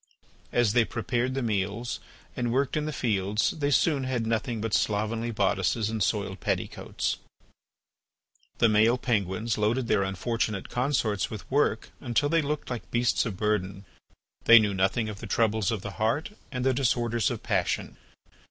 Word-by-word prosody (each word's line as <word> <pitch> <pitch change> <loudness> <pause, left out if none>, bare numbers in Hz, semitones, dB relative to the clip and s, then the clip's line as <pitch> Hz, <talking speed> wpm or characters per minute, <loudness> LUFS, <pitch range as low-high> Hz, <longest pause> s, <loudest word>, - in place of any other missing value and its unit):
As 120 -4 +2
they 120 -1 +5
prepared 120 +3 -2
the 135 - -1
meals 105 +2 -2 0.4
and 120 -1 -1
worked 135 +3 +1
in 150 0 -1
the - - -2
fields 105 -6 0
they 145 -2 -1
soon 145 0 +2
had 125 -3 -1
nothing 115 +1 -1
but 110 0 -3
slovenly 110 +2 0
bodices 105 0 +1
and 110 -1 -3
soiled 100 -1 -1
petticoats. - - -2 1.4
The 115 - +5
male 110 +3 +4
penguins 110 -2 -1
loaded 115 +4 +1
their 105 -3 +3
unfortunate 100 +1 -2
consorts 125 -6 0
with 110 - -7
work 135 -5 +1
until 125 +4 0
they 165 +1 +3
looked 150 -2 -3
like 120 - -5
beasts 120 -1 +1
of 100 -5 -5
burden. 100 -2 -1 0.6
They 115 - +10
knew 105 -3 +3
nothing 95 +4 +1
of 105 -2 -6
the 115 - -7
troubles 110 -1 +1
of 110 -5 -2
the 105 - -5
heart 115 - 0 0.2
and 125 -1 -3
the 130 - +4
disorders 120 -3 +1
of - - -5
passion. - - -1
115 Hz, 160 wpm, -27 LUFS, 105-125 Hz, 1.4 s, They